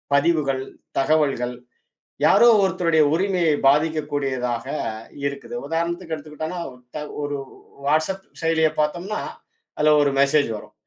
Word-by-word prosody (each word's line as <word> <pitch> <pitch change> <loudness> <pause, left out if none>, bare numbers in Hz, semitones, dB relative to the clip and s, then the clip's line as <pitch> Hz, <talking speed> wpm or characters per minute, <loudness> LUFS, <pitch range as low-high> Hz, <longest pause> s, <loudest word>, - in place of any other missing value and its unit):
பதிவுகள், 140 -3 +2 0.4
தகவல்கள் 135 -4 +1 0.7
யாரோ 240 - +6 0.2
ஒருத்தருடைய 165 -4 +2
உரிமையை 180 -3 +2
பாதிக்கக்கூடியதாக 140 -5 +1 0.6
இருக்குது. 140 -2 -5
உதாரணத்துக்கு 170 +1 -2
எடுத்துக்கிட்டான்னா, 155 +3 -6 0.6
ஒரு 145 0 -2 0.5
WhatsApp 160 +6 +1 0.2
செயலியைப் 160 -1 +2
பார்த்தோம்னா 175 +7 -1 0.6
அதுல 150 0 +4
ஒரு 140 - +3
மெசேஜ் 140 -1 +3
வரும். - - -12
155 Hz, 95 wpm, -23 LUFS, 140-165 Hz, 0.7 s, யாரோ